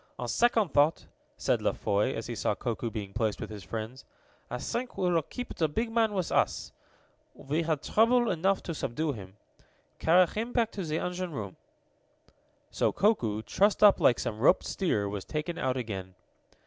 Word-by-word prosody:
"On -, -, -4 dB
second 230 Hz, -5 st, +2 dB
thought," 150 Hz, +2 st, +2 dB, 0.3 s
said -, -, +1 dB
La -, -, +1 dB
Foy, 105 Hz, +5 st, 0 dB
as 115 Hz, -, -4 dB
he 120 Hz, -, -4 dB
saw 105 Hz, -2 st, -1 dB
Koku 120 Hz, 0 st, -3 dB
being 105 Hz, -3 st, -6 dB
placed 110 Hz, -1 st, -1 dB
with -, -, -6 dB
his 105 Hz, -3 st, -8 dB
friends, 115 Hz, +5 st, -6 dB, 0.5 s
"I 125 Hz, -, -3 dB
think 240 Hz, -, -4 dB
we 180 Hz, -1 st, +1 dB
will 165 Hz, -1 st, +3 dB
keep 245 Hz, -, -7 dB
the 160 Hz, -3 st, 0 dB
big 225 Hz, +9 st, -2 dB
man 225 Hz, -2 st, +2 dB
with 185 Hz, -3 st, -1 dB
us. -, -, +1 dB, 0.6 s
We 150 Hz, +4 st, -2 dB
had 160 Hz, -3 st, -1 dB
trouble 240 Hz, +2 st, +3 dB
enough 190 Hz, +3 st, +1 dB
to 170 Hz, -, -4 dB
subdue 150 Hz, +2 st, -2 dB
him. 100 Hz, -5 st, -10 dB, 0.6 s
Carry 180 Hz, +3 st, +5 dB
him 225 Hz, +7 st, -4 dB
back 230 Hz, -3 st, +1 dB
to 195 Hz, -, -5 dB
the 155 Hz, -1 st, -2 dB
engine 180 Hz, 0 st, -3 dB
room." 100 Hz, -7 st, -5 dB, 1.2 s
So -, -, +1 dB
Koku, 115 Hz, -, +1 dB
trussed 205 Hz, -, +2 dB
up 205 Hz, -1 st, +7 dB
like 120 Hz, -, +4 dB
some 110 Hz, -, -3 dB
roped 145 Hz, +10 st, +4 dB
steer, 110 Hz, -, 0 dB
was 100 Hz, -1 st, -4 dB
taken 155 Hz, +3 st, -4 dB
out 130 Hz, -1 st, 0 dB
again. 95 Hz, -6 st, -5 dB
155 Hz, 185 wpm, -29 LUFS, -, 1.2 s, up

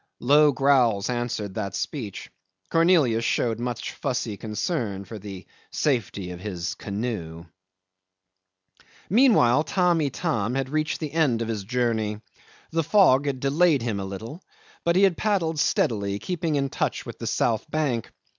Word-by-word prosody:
Low 145 Hz, +3 st, +5 dB
growls 125 Hz, -7 st, +2 dB
answered 120 Hz, -5 st, -3 dB
that 100 Hz, -1 st, -4 dB
speech. 110 Hz, -10 st, -5 dB, 0.4 s
Cornelius 165 Hz, -9 st, +3 dB
showed 115 Hz, -1 st, 0 dB
much 120 Hz, -1 st, -3 dB
fussy 120 Hz, -4 st, -3 dB
concern 105 Hz, -, -3 dB
for 110 Hz, +2 st, -8 dB
the 95 Hz, -2 st, -9 dB, 0.2 s
safety 105 Hz, -9 st, -1 dB
of 90 Hz, -, -8 dB
his 90 Hz, -3 st, -4 dB
canoe. 100 Hz, -6 st, -5 dB, 1.7 s
'Meantime 200 Hz, -, +5 dB
Tamb' 175 Hz, +2 st, +2 dB
Itam 135 Hz, -, -1 dB
had 135 Hz, -1 st, -1 dB
reached 155 Hz, +1 st, -1 dB
the 155 Hz, -3 st, -3 dB
end 135 Hz, -8 st, +2 dB
of 115 Hz, -, -5 dB
his 105 Hz, -3 st, -3 dB
journey. 110 Hz, -2 st, -1 dB, 0.5 s
The 165 Hz, -, +1 dB
fog 145 Hz, -7 st, +4 dB
had 135 Hz, -2 st, -2 dB
delayed 145 Hz, 0 st, +2 dB
him 110 Hz, -4 st, -2 dB
a 95 Hz, -, -4 dB
little, 110 Hz, -, -7 dB, 0.4 s
but 170 Hz, 0 st, +2 dB
he 190 Hz, -, +4 dB
had 190 Hz, -4 st, +4 dB
paddled 170 Hz, -7 st, 0 dB
steadily, 100 Hz, -8 st, +1 dB
keeping 170 Hz, -, -2 dB
in 140 Hz, -1 st, 0 dB
touch -, -, -2 dB
with -, -, -9 dB
the -, -, -4 dB
south 115 Hz, +5 st, 0 dB
bank. 145 Hz, -8 st, -1 dB
125 Hz, 145 wpm, -25 LUFS, 105-155 Hz, 1.7 s, Low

